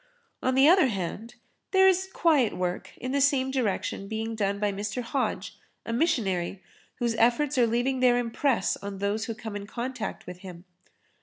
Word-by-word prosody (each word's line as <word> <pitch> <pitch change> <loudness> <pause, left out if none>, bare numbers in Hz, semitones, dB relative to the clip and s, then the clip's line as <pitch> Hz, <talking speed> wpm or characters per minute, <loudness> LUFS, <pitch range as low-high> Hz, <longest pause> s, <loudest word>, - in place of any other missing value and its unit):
On 260 0 +1
the 270 +2 +6
other 350 -3 +6
hand, 215 +3 -4 0.3
there 380 0 +5
is 380 0 +2
quiet 300 - +2
work 180 0 -3
in 255 - -4
the 280 +1 +1
same 265 -1 +3
direction 215 -5 -2
being 220 +2 -3
done 200 -2 -1
by 205 -1 +1
Mr. 205 +4 -4
Hodge, 265 +3 -3 0.3
a 230 - -3
missionary 200 - 0 0.3
whose 235 -1 -1
efforts 245 +5 +2
are 245 -2 +4
leaving 245 +3 0
their 250 -1 +4
impress 240 -1 0
on 200 -1 -7
those 205 +3 -1
who 230 - -4
come 220 -2 -7
in 205 0 -6
contact 240 -1 -5
with 180 0 -9
him. 180 -2 -10
235 Hz, 175 wpm, -27 LUFS, 200-265 Hz, 0.3 s, the